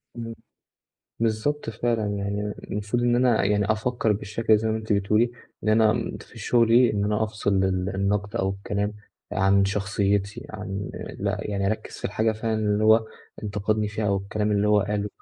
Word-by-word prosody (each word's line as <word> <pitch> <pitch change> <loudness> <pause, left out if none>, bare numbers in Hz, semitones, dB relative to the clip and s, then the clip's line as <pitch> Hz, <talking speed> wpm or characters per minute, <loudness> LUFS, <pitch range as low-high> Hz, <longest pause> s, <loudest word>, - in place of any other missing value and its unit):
إمم، 115 -1 -5 0.9
بالضبط 115 +4 0
فعلًا 115 -1 0
يعني 100 +1 -2 0.2
المفروض 105 +4 -1
إن 120 0 +3
أنا 125 -4 +3
يعني 105 +1 +2
أفكر 110 0 0
بالشكل 105 +1 +1
زي 110 +1 -1
ما 110 - 0
أنتِ 110 0 -2
بتقولي، 105 +4 +2 0.3
إن 110 - 0
أنا 110 0 +2
ت - - -11
في - - -15
شغلي 120 0 +4
إن 100 -1 0
أنا 105 +1 +1
أفصِل 100 -3 0
ال 95 0 0
النقد 100 +1 -1
أو 95 0 +1
الكلام 100 +1 -2 0.4
آآ، - - -3
عن 100 +1 +4
شخصيتي 100 +3 -1
عن 100 -3 -5 0.3
لأ - - -1
يعني 100 -1 -2
أركِّز 110 +2 -3
في - - -13
الحاجة 110 0 +1
فعلًا 110 +1 -2
اللي 105 0 +1
هو 110 +1 +5 0.4
انتقدني 105 0 -1
فيها 105 0 -2
والكلام 100 +2 0
اللي 105 0 +2
هو 105 0 +5
قاله، 105 +1 -1
105 Hz, 175 wpm, -25 LUFS, 100-110 Hz, 0.9 s, هو